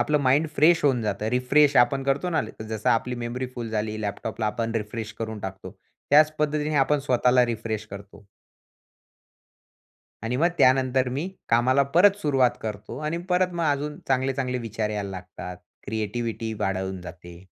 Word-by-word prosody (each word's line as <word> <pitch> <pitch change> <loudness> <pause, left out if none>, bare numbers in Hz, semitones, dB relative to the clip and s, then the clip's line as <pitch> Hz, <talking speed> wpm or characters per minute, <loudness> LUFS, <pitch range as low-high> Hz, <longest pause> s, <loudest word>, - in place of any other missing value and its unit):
आपलं 150 +5 +2
mind 140 +4 +3
fresh 160 +3 +5
होऊन 135 -4 +3
जातं, 105 0 -2
रिफ्रेश 135 +4 +3
आपण 125 +3 +4
करतो 140 +6 0
ना, 160 - +2 0.2
जसं 110 -1 -3
आपली 125 +2 +1
मेमरी 125 +2 -3
फुल 120 -2 -5
झाली 110 0 -2
लॅपटॉपला 110 +2 -3
आपण 115 +2 -2
रिफ्रेश 110 0 -4
करून 110 -1 -4
टाकतो, 95 -1 -7 0.4
त्याच 155 +2 +6
पद्धतीने 150 0 0
आपण 145 +2 +3
स्वतःला 125 0 +4
रिफ्रेश 110 -2 -3
करतो. 100 +1 -11 2.0
आणि 115 +2 -2
मग 165 +6 +3
त्यानंतर 130 0 +3
मी 140 +8 -3 0.2
कामाला 125 +4 +4
परत 200 +3 +6
सुरुवात 135 -5 +3
करतो 105 +2 -6
आणि 160 +2 -1
परत 180 0 +2
मग 170 -1 -2
अजून 145 +1 -3
चांगले-चांगले 130 -1 0
विचार 110 -2 -3
यायला 105 -2 -3
लागतात, 90 -1 -8 0.3
क्रिएटिव्हिटी 110 +1 -3
वाढवून 95 -1 -2
जाते. 90 0 -11
120 Hz, 150 wpm, -25 LUFS, 110-140 Hz, 2.0 s, त्याच